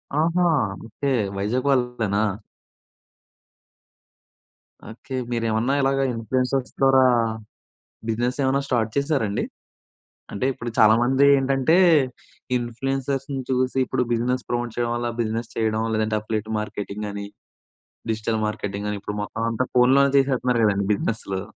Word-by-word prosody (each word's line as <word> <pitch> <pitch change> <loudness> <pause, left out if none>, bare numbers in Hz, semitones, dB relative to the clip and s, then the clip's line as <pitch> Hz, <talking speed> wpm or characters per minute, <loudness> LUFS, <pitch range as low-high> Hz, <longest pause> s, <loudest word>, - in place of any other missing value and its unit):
ఆహా! 165 +4 +2 0.4
ఓకే 140 +5 -3 0.3
వైజాగ్ 115 +7 -1
వాళ్ళేనా. 125 -6 +1 2.7
ఓకే. 125 +3 -8 0.2
మీరేమన్నా 115 +2 0
ఇలాగ 135 0 +1
ఇన్‌ఫ్లుయెన్సర్స్ 125 +3 -1
ద్వారా, 135 -1 +5 1.1
బిజినెస్ 120 +4 -1
ఏమన్నా 135 +1 +2
స్టార్ట్ 115 -4 0
చేసారండి? 140 -8 0 0.9
అంటే 100 - -3
ఇప్పుడు 120 -2 -6
చాలా 110 0 +7
మంది 130 +3 +3
ఏంటంటే, 135 +4 +2 0.8
ఇన్‌ఫ్లుయెన్సర్స్‌ని 135 +3 -3
చూసి 130 0 0
ఇప్పుడు 125 - 0
బిజినెస్ 125 +2 -1
ప్రమోట్ 120 -1 -2
చేయడం 120 -1 0
వల్ల 120 0 -2
బిజినెస్ 115 +1 -3
చేయడం, 110 0 0
లేదంటే 110 0 0
అఫిలియేట్ 110 0 -4
మార్కెటింగ్ 105 0 -5
అని, 100 0 -5 0.9
డిజిటల్ 110 0 -1
మార్కెటింగ్ 105 -1 -4
అని 105 - -3
ఇప్పుడు 105 +1 -5
మొత్తం 110 +2 -5
అంతా 120 +3 -1
ఫోన్‌లోనే 135 +2 +5
చేసేస్తున్నారు 125 -3 +2
కదండీ! 100 -1 +1
బిజినెస్‌లు. 100 -2 -3
120 Hz, 115 wpm, -23 LUFS, 110-135 Hz, 2.7 s, చాలా